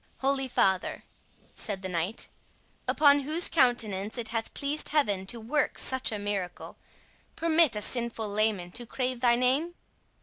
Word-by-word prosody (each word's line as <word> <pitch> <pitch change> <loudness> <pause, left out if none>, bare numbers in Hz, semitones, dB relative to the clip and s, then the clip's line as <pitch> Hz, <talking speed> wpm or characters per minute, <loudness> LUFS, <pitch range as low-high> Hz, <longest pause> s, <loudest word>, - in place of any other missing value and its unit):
"Holy 270 0 +1
father," 190 -6 0 0.5
said 195 -3 -4
the - - -2
knight, 180 +4 -2 0.6
"upon 285 -1 +5
whose 310 +5 +2
countenance 225 - +1
it 230 -2 -3
hath 225 0 -3
pleased 285 +2 -2
Heaven 205 -11 0
to 235 +3 0
work 270 +7 -1
such 260 -2 +2
a 215 - -3
miracle, 200 -3 -4 0.6
permit 325 -5 +3
a 210 - -1
sinful 235 -3 -2
layman 205 -4 0
to 240 +5 -4
crave 255 0 -3
thy 240 -1 +4
name?" 270 +8 +1
235 Hz, 145 wpm, -28 LUFS, 205-275 Hz, 0.6 s, upon